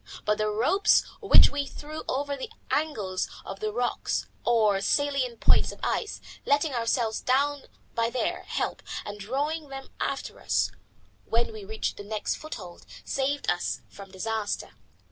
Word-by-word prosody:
But 210 0 +2
the 215 - +2
ropes 320 - +4 0.2
which 410 - +8
we 285 -1 -1
threw 305 +1 -7
over 280 +2 0
the 275 - -5 0.2
angles 210 -12 0 0.2
of 195 - -6
the 215 0 -1
rocks, 245 +2 0 0.2
or 215 -4 +4
salient 275 0 +1
points - - +5
of - - -11
ice, 435 - -1 0.2
letting 285 +1 +2
ourselves 230 -1 +1
down 280 +2 +2 0.3
by 230 0 +2
their 250 +1 -1
help - - -2 0.2
and 205 0 -6
drawing 290 +8 -2
them 270 0 -7
after - - -2
us - - +1 0.5
when 230 0 +1
we 215 -2 -7
reached 220 +2 -2
the 205 - -6
next 210 +1 -1
foothold, 190 - -8 0.2
saved 280 +1 0
us 175 - -1
from 200 -1 -11
disaster. 210 +2 -2
240 Hz, 150 wpm, -28 LUFS, 210-285 Hz, 0.5 s, which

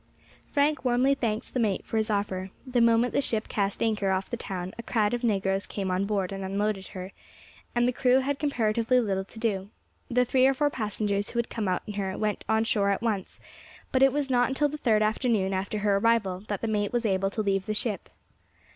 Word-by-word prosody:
Frank 295 +1 +1
warmly 255 +2 +3
thanked 225 -5 -2
the 255 - 0
mate 210 -5 0
for 225 - -2
his 220 0 0
offer. 195 -2 -1 0.2
The 250 -2 +1
moment 230 +1 +4
the - - +2
ship 225 -5 -1
cast 200 0 -1
anchor 210 -3 +1
off 190 0 -1
the - - 0
town 185 -5 -5
a - - -1
crowd 220 -2 +1
of 240 0 -2
negroes 195 -3 0
came 195 -2 -3
on 185 +2 +1
board 200 -3 -1
and 195 0 -5
unloaded 195 0 -1
her, 185 -1 -7 0.6
and 240 0 +3
the - - +3
crew 255 +1 +3
had 280 +1 -2
comparatively 235 -3 +2
little 195 -5 0
to 210 - -16
do; 205 -4 -1 0.4
the 250 +1 +3
three 260 +1 +4
or 270 - +2
four 290 +2 +1
passengers 205 -3 -2
who - - -6
had 235 - -1
come 220 -4 -2
out 180 -1 0
in 210 - -6
her 195 -2 -3
went 210 -1 -1
on 220 0 +3
shore 215 -4 +1
at 200 +3 0
once, 210 -5 -2 0.5
but 260 - +2
it 270 0 +6
was 290 0 -1
not 245 -1 +2
until 290 +2 +1
the 300 - -5
third 220 -6 +3
afternoon 215 -3 +1
after 195 +3 -2
her 205 -1 +2
arrival 205 -4 +2
that 205 -2 -3
the 230 - -1
mate 205 -2 0
was 240 -1 0
able 195 -1 +1
to 215 +2 -2
leave 195 -1 0
the 215 - -1
ship. 210 -2 -2
215 Hz, 225 wpm, -27 LUFS, 195-245 Hz, 0.6 s, it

